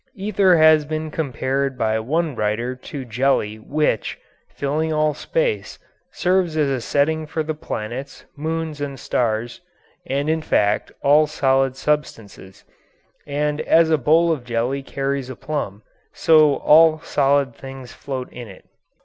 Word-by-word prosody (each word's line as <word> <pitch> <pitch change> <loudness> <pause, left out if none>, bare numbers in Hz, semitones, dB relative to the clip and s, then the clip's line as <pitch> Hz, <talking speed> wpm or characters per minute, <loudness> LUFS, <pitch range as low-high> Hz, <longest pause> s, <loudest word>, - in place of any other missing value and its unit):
Ether 195 -3 +3
has 155 -1 +6
been 155 +1 -4
compared 135 -2 -2
by 110 0 0
one 155 +5 -1
writer 115 +4 -1
to 130 +1 -8
jelly 120 -3 0
which, 145 -2 -1 0.3
filling 155 +3 -2
all 155 -1 +1
space, - - -2 0.3
serves 180 -3 0
as 150 -2 +2
a 130 -2 -1
setting 155 +5 0
for 160 +1 -2
the 155 +1 -3
planets, 130 -2 -6
moons, 160 0 -4
and 140 -2 -4
stars, 115 -1 -2 0.5
and, 140 +2 -1
in 160 0 +1
fact, 105 -9 +1
all 150 +2 +5
solid 135 -3 +1
substances; 115 -10 -4 0.6
and 150 +1 -1
as 165 -1 +4
a 155 - +4
bowl 165 +5 +3
of 150 -6 -2
jelly 120 +3 -2
carries 135 -1 -3
a 130 - -6
plum, 110 -9 -5 0.3
so 155 -3 +5
all 160 +1 +5
solid 140 -4 +1
things 135 -1 -10
float 130 -3 -5
in 120 -2 -8
it. 95 -2 -14
140 Hz, 140 wpm, -21 LUFS, 130-155 Hz, 0.6 s, has